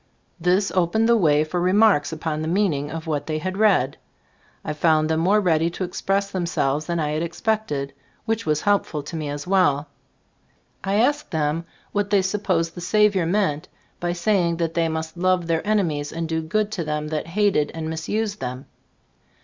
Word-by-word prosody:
This 185 +3 +2
opened 185 +5 +2
the 235 - +5
way 155 -8 +3
for 175 +3 -2
remarks 185 -5 +4
upon 155 -1 -3
the 155 - -3
mean 190 +1 +2
ing 145 +1 -3
of 160 0 -6
what 150 -3 -2
they 155 -1 -1
had 185 +4 -3
read. 195 -11 +3 0.7
I 155 - -2
found 155 0 +2
them 160 - +1
more 195 +6 +3
ready 165 -4 +2
to 175 - -5
express 195 +2 -1
them 180 -2 -2
selves 145 -2 0
than 170 -1 -1
I 150 -1 0
had 155 +1 -1
expected, 170 -5 -2 0.3
which 225 0 -1
was 150 -1 0
helpful 200 -7 0
to 150 - -7
me 155 -2 -3
as 145 0 -5
well. 155 -6 +2 0.9
I 195 +1 0
asked 285 +7 +2
them 160 -1 -1 0.3
what 205 0 -1
they 200 -2 +3
supposed 185 -4 0
the 175 - -8
Saviour 200 -2 +3
meant 175 -6 0 0.3
by 175 0 -1
saying 175 -2 +1
that 165 -1 -1
they 165 -1 +1
must 160 +1 -4
love 185 0 +2
their 165 -1 0
enemies 165 -9 0
and 165 0 -3
do 160 0 -1
good 210 +6 -1
to 185 -6 -2
them 150 0 -3
that 155 0 -3
hated 200 -8 +3
and 160 -1 -4
misused 205 +7 -2
them? 125 +1 -5
170 Hz, 190 wpm, -23 LUFS, 155-195 Hz, 0.9 s, the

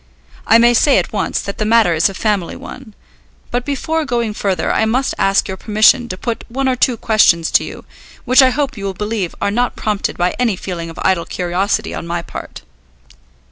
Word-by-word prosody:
I 225 - +6
may 240 +1 +5
say 270 +4 +4
at - - -1
once 205 - -1
that 200 - -7
the - - +1
matter 220 -4 +3
is 165 +3 +2
a 195 - -9
family 205 -5 -1
one; 230 -6 -11 0.6
but 245 0 -1
before 315 +4 -2
going 235 -5 -2
further 190 -5 -1
I - - +1
must 245 +5 0
ask 195 0 +2
your 190 -1 -5
permission 220 +4 +3
to 185 - -5
put 235 +3 -4
one 265 +3 -2
or 260 - +2
two 250 -1 +1
questions 195 -7 +3
to - - +4
you, - - -9 0.4
which 255 +1 +6
I 260 - +5
hope 280 +1 -2
you 200 - -6
will 195 -1 -3
believe 210 -3 -3
are 200 - +1
not 245 +3 0
prompted 210 -2 -2
by 180 +1 0
any 235 -5 +1
feeling 175 -2 -6
of 165 - -11
idle 185 -3 +1
curiosity 190 +4 -2
on - - -6
my 170 0 -3
part." - - -9
215 Hz, 210 wpm, -17 LUFS, 190-245 Hz, 0.6 s, I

